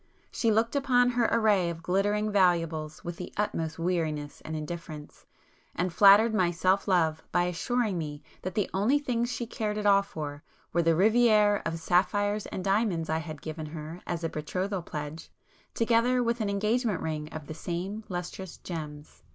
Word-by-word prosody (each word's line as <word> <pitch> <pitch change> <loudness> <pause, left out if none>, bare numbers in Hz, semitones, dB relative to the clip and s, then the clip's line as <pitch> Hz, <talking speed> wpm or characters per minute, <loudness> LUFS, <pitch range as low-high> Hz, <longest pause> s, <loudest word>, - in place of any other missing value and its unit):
She 230 - 0
looked 225 +4 +2
upon 250 -3 +3
her 240 -2 +2
array 205 -6 +3
of 165 -1 -7
glittering 205 +4 +1
valuables 165 -5 +1
with 170 -1 -5
the 180 - -7
utmost 165 -6 -2
weariness 160 -4 -2
and 160 - -5
indifference, 155 -1 -7 0.5
and 180 0 -1
flattered 205 +4 +7
my 185 -5 +3
self 185 +4 +1
love 160 -5 +2
by 175 0 +3
assuring 195 +3 -1
me 150 -2 -6 0.2
that 185 0 -5
the 210 - +1
only 215 +9 +3
things 245 -4 -1
she 240 0 -3
cared 215 -2 -3
at 210 - -3
all 200 -1 +6
for 150 -6 -6 0.3
were 170 - +3
the 165 -1 +3
riviére 215 +1 +4
of 165 0 -3
sapphires 205 +5 +1
and 185 - -5
diamonds 195 -5 +1
I 160 - +1
had 155 -2 -8
given 155 0 -5
her 155 +2 -8
as 170 -1 -3
a 165 - 0
betrothal 185 +6 -3
pledge, 150 -1 -7 0.5
together 235 +2 +3
with 235 0 0
an 210 - 0
engagement 215 +2 0
ring 155 -1 -3
of 155 -2 -7
the 155 - -7
same 180 +7 -4
lustrous 180 0 -6
gems. 150 -4 -8
185 Hz, 175 wpm, -28 LUFS, 160-215 Hz, 0.5 s, flattered